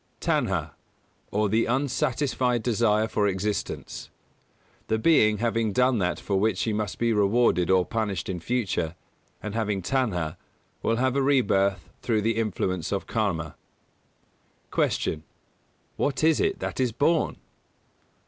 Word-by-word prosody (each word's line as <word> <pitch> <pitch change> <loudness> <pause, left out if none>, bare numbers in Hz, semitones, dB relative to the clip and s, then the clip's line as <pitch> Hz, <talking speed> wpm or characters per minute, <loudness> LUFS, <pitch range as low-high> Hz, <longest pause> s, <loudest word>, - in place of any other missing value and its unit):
Tanhā, - - 0 0.6
or 105 +1 +1
the 110 +3 +1
unsatisfied 125 -1 0
desire 110 -2 +2
for 105 -2 +1
existence. 100 +2 -3 0.8
The 110 - +1
being 110 -6 +4
having 115 -1 0
done 125 0 +3
that 90 -2 0
for 100 -2 -1
which 110 +2 +1
he 110 - 0
must 105 -2 -2
be 115 -1 +1
rewarded 105 -4 +3
or 95 -1 +4
punished 105 -6 -2
in 90 -2 -3
future, 85 -5 -1 0.5
and 105 - -4
having 105 -4 -1
Tanhā, 90 - -1 0.4
will 115 - +1
have 130 +2 +1
a 140 - +2
rebirth 100 - +2
through 110 -3 0
the 115 0 +1
influence 95 -6 -1
of 100 -1 -1
Karma. 85 -9 -2 1.2
233. - - +1
Q. 75 - -17 0.8
_What 140 +1 0
is 160 -1 +4
it 200 -1 +1
that - - -5
is 125 -2 +2
born? 150 +7 +1
110 Hz, 140 wpm, -26 LUFS, 95-125 Hz, 1.2 s, being